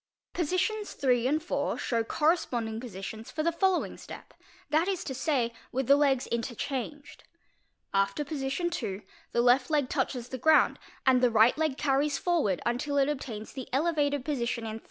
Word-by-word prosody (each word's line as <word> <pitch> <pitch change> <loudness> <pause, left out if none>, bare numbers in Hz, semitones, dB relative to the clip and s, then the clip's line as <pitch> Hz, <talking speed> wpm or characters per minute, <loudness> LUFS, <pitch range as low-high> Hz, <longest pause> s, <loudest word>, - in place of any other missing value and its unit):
Positions 380 +5 -1
III. 250 -2 +3
and 300 +4 +2
IV. 320 - -2
show 230 -2 0
corresponding 240 -6 0
positions 220 -1 -7
for 310 - -3
the 335 - +2
following 375 +2 0
step, - - -11 0.4
that 315 +4 +3
is 385 -3 -1
to 265 - -4
say, 260 -4 0 0.2
with 265 +1 -1
the 280 - +6
legs 275 -3 +2
ene 235 0 0 1.5
After 195 +8 +1
position 280 +4 -2
II. 200 -3 -4 0.3
the 235 - +2
left 245 +1 +4
leg 290 -4 +1
touches 245 -1 -2
the 260 - -5
ground 315 +5 +4 0.3
and 255 -1 +5
the 250 -2 +4
ight 225 +3 +6
leg 310 -4 0
carries 285 0 +1
forward 305 - 0
until 265 +5 -1
it 275 0 +3
obtains 235 -7 -5
the 260 - -7
elevated 285 -2 +1
position 240 -5 -2
in 220 0 -4
III. - - -10
270 Hz, 170 wpm, -29 LUFS, 235-310 Hz, 1.5 s, the